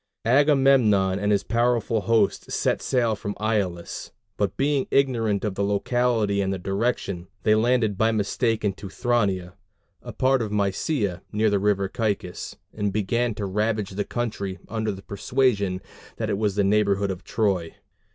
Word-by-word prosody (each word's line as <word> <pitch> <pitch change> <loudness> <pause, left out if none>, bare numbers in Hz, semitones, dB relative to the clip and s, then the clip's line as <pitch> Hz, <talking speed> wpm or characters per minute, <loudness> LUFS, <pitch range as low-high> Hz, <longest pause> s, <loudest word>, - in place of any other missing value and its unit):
Agamemnon 130 -8 +4
and 105 +1 0
his 100 -1 +2
powerful 115 -1 +1
host 110 -2 +1
set - - 0
sail 120 -4 +1
from 100 0 -5
Aulis; 100 -6 -2 0.2
but 100 -2 -1
being 140 -1 +1
ignorant 115 -7 +1
of 105 - -1
the 100 - -2
locality 105 0 +1
and 95 -1 0
the 95 - -2
direction, 95 -2 -2 0.2
they 110 - +4
landed 110 -2 +2
by 110 0 +3
mistake 110 +1 0
in 100 - +1
Teuthrania, 100 -3 -1 0.5
a - - -8
part 130 0 +2
of 110 -2 -3
Mysia 100 - -1
near 105 0 +2
the 100 - +2
river 100 -1 +1
Caicus, 100 -3 -3 0.2
and 105 -2 -1
began 115 +3 0
to 105 - -3
ravage 105 +1 -1
the 100 +2 -2
country 100 -6 -3
under 110 -1 -2
the 95 0 -8
persuasion 100 -3 0 0.4
that - - -2
it - - 0
was 105 -3 0
the 105 - +2
neighborhood 100 -1 +2
of 95 0 -7
Troy. 95 -7 -1
105 Hz, 160 wpm, -24 LUFS, 100-115 Hz, 0.5 s, Agamemnon